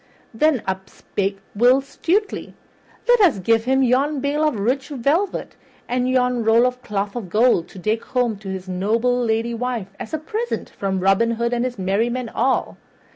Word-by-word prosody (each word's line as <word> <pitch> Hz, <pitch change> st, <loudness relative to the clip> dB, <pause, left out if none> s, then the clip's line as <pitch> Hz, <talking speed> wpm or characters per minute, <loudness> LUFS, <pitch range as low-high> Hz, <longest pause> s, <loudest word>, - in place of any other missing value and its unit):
Then 280 Hz, +1 st, +2 dB
up 190 Hz, 0 st, -3 dB
spake 195 Hz, 0 st, -3 dB, 0.2 s
Will 245 Hz, +5 st, +5 dB
Stutely, 360 Hz, +9 st, -2 dB, 0.5 s
"Let 485 Hz, -2 st, +5 dB
us 345 Hz, -, +5 dB
give 225 Hz, +4 st, +2 dB
him 265 Hz, +1 st, +3 dB
yon 270 Hz, +4 st, +2 dB
bale 285 Hz, +3 st, 0 dB
of 300 Hz, -, -1 dB
rich 255 Hz, +7 st, 0 dB
velvet 300 Hz, +8 st, -1 dB, 0.3 s
and 250 Hz, +1 st, 0 dB
yon 250 Hz, -2 st, +1 dB
roll 225 Hz, +2 st, +5 dB
of 250 Hz, 0 st, -1 dB
cloth 205 Hz, -1 st, -3 dB
of 220 Hz, -7 st, -5 dB
gold 220 Hz, -4 st, +3 dB
to -, -, -14 dB
take 215 Hz, +5 st, -1 dB
home 245 Hz, -4 st, 0 dB
to 200 Hz, -2 st, -8 dB
his 190 Hz, 0 st, -5 dB
noble 230 Hz, +7 st, +1 dB
lady 225 Hz, +1 st, 0 dB
wife 230 Hz, -5 st, -3 dB
as 240 Hz, -, -7 dB
a 315 Hz, -, -1 dB
present 440 Hz, +10 st, -4 dB
from 190 Hz, -2 st, -2 dB
Robin 195 Hz, +5 st, +3 dB
Hood 235 Hz, +1 st, -1 dB
and 240 Hz, 0 st, 0 dB
his 250 Hz, -2 st, -3 dB
merry 195 Hz, +5 st, +1 dB
men 250 Hz, -1 st, -3 dB
all." 255 Hz, +4 st, 0 dB
240 Hz, 180 wpm, -21 LUFS, 210-260 Hz, 0.5 s, Will